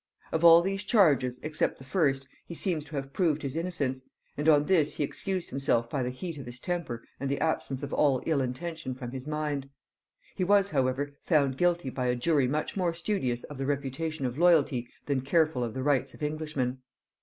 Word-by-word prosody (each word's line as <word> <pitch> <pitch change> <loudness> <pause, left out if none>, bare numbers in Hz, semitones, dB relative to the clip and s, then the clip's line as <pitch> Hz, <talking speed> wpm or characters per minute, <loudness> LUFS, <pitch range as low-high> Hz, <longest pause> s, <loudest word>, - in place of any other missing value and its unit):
Of 160 - -1
all 170 0 +9
these 195 +2 -2
charges 145 - +3
except 155 0 -1
the - - -12
first 135 -2 0 0.2
he 170 - -7
seems 165 -4 0
to 150 +1 -9
have 135 0 -4
proved 160 -5 +1
his 140 0 -3
innocence, 155 -7 -1 0.3
and 150 +2 +1
on 150 -1 +5
this 165 -5 +2
he - - +1
excused 185 +5 -2
himself 120 -3 +1
by 140 - -1
the 125 - -1
heat 155 +5 -6
of 130 - -8
his 120 +1 -8
temper 170 -10 -3 0.2
and 140 - -2
the 140 - -1
absence 140 -4 -1
of 140 - -5
all 140 -4 +2
ill 155 -4 +2
intention 130 +1 -4
from 125 -2 -7
his 130 +1 -7
mind. 150 -3 -2 0.7
He 185 - -1
was 200 +1 +4
however 135 +1 0
found 140 -6 +2
guilty 175 -3 +1
by 125 -1 -2
a 125 - +2
jury 140 +1 +2
much 150 +4 -2
more 175 -4 0
studious 150 - -1
of 145 -2 -9
the 135 - -2
reputation 145 +1 -2
of 125 +3 -3
loyalty 150 -8 +4 0.2
than 140 -2 0
careful 155 -1 +2
of 115 -1 -4
the 130 - -2
rights 135 -2 +1
of - - -9
Englishmen. 150 -4 -2
145 Hz, 205 wpm, -29 LUFS, 130-165 Hz, 0.7 s, all